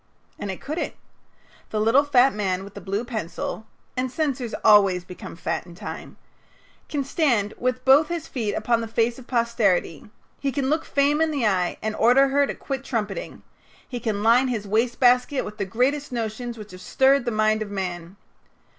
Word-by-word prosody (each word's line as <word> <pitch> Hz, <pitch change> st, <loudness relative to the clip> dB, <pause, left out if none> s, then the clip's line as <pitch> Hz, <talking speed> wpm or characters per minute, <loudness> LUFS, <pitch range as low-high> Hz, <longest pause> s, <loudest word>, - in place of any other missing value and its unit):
And 205 Hz, -, -4 dB
it 190 Hz, -, -5 dB
couldn't. 310 Hz, +4 st, -4 dB, 0.7 s
The 215 Hz, -, -2 dB
little 225 Hz, +6 st, +4 dB
fat 270 Hz, -2 st, +4 dB
man 190 Hz, -3 st, -1 dB
with 200 Hz, 0 st, -11 dB
the -, -, -9 dB
blue 200 Hz, +4 st, -3 dB
pencil 220 Hz, -1 st, -5 dB, 0.3 s
and 255 Hz, 0 st, -2 dB
censors 260 Hz, -5 st, -2 dB
always 195 Hz, -4 st, +5 dB
become 180 Hz, -1 st, -10 dB
fat 175 Hz, -, -3 dB
in 170 Hz, -, -12 dB
time 205 Hz, +4 st, -8 dB, 0.7 s
can 290 Hz, -2 st, -1 dB
stand 250 Hz, -8 st, +1 dB
with 255 Hz, 0 st, -1 dB
both 280 Hz, +4 st, +6 dB
his 340 Hz, -3 st, -4 dB
feet 220 Hz, -6 st, -2 dB
upon 230 Hz, +1 st, +1 dB
the 225 Hz, -, -4 dB
face 230 Hz, +2 st, 0 dB
of 255 Hz, -, -14 dB
posterity; 225 Hz, -, 0 dB, 0.3 s
he 275 Hz, -, -1 dB
can 270 Hz, +1 st, -1 dB
look 320 Hz, +1 st, 0 dB
Fame 285 Hz, +2 st, +2 dB
in 320 Hz, -, +3 dB
the 280 Hz, -6 st, -1 dB
eye 185 Hz, -4 st, +1 dB
and 215 Hz, 0 st, -2 dB
order 260 Hz, +4 st, +5 dB
her 280 Hz, +1 st, +3 dB
to -, -, -4 dB
quit 270 Hz, -1 st, -5 dB
trumpeting; 230 Hz, -, -4 dB, 0.4 s
he 245 Hz, -, -5 dB
can 210 Hz, -3 st, -2 dB
line 240 Hz, +4 st, +5 dB
his 220 Hz, -5 st, -3 dB
wastebasket 245 Hz, +4 st, +2 dB
with 210 Hz, +1 st, -9 dB
the 200 Hz, -, 0 dB
greatest 260 Hz, +8 st, 0 dB
notions 235 Hz, 0 st, -4 dB
which 210 Hz, -1 st, -10 dB
have 185 Hz, 0 st, -11 dB
stirred 265 Hz, +5 st, +3 dB
the -, -, +1 dB
mind 215 Hz, -1 st, +1 dB
of 215 Hz, -, -4 dB
man. 180 Hz, -2 st, -5 dB
235 Hz, 185 wpm, -24 LUFS, 210-265 Hz, 0.7 s, both